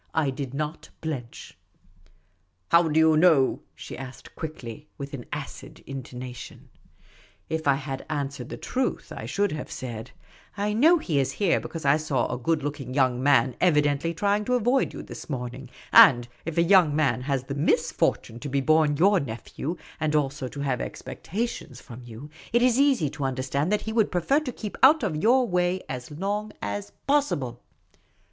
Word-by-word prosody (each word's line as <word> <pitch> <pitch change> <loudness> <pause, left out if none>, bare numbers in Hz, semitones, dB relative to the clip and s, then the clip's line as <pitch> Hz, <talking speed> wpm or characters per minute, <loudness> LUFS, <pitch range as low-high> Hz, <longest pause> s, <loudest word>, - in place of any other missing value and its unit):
I 150 -4 +2
did 135 -1 -5
not 155 +2 -4
blench. 135 -7 -6 0.6
" 90 0 -40
How 170 0 +6
do 155 0 +2
you 160 0 +5
know?" 155 -5 +4
she - - -8
asked 130 0 -10
quickly, 150 -3 -7
with 140 0 -7
an 125 -4 -6
acid - - -7
intonation. 125 -2 -8 0.8
If 160 -1 -2
I 140 - +5
had 135 -1 -5
answered 140 -4 -3
the - - -6
truth, 255 0 -2
I - - -6
should 205 0 0
have 150 - -5
said: 115 -3 -6 0.3
" - - -27
I 205 +1 0
know 315 +11 +5
he 165 - 0
is 135 - 0
here, 195 -5 +2
because 165 -3 -7
I 140 +2 +5
saw 145 -6 0
a - - -4
good 155 +3 0
looking 140 -3 -4
young 130 -3 +2
man 135 -2 +3
evi 155 -5 +4
dently 145 +3 -1
trying 205 +3 +1
to 250 - +1
avoid 245 +3 +2
you - - -8
this - - -10
morning; 125 -1 -5 0.2
and 120 -2 +8 0.2
if 165 0 -4
a 170 - +5
young 170 -5 +5
man 140 -6 +1
has 135 -1 -1
the 140 - -5
misfortune 155 -4 0
to 145 - -6
be 140 +1 +1
born 155 +1 +3
j'our 190 +2 +4
nephew, 135 +7 -5 0.2
and 155 -1 0
also 140 -2 0
to 140 +3 -7
have 135 -3 -1
expectations 205 - -5
from 125 0 -11
you, 120 +5 -10 0.2
it 240 +1 +3
is 250 0 +4
easy 265 - +3
to 145 -1 -6
understand 135 +5 -1
that 210 - +2
he 220 - -5
would 220 -2 +2
prefer 185 - +2
to 300 -5 -5
keep 215 -3 -7
out 300 +4 +7
of 160 - -1
your 250 +4 +4
way 180 0 +1
as 125 -1 -6
long 200 +7 -3
as 100 0 -4
possible." 145 - 0
150 Hz, 185 wpm, -26 LUFS, 130-180 Hz, 0.8 s, and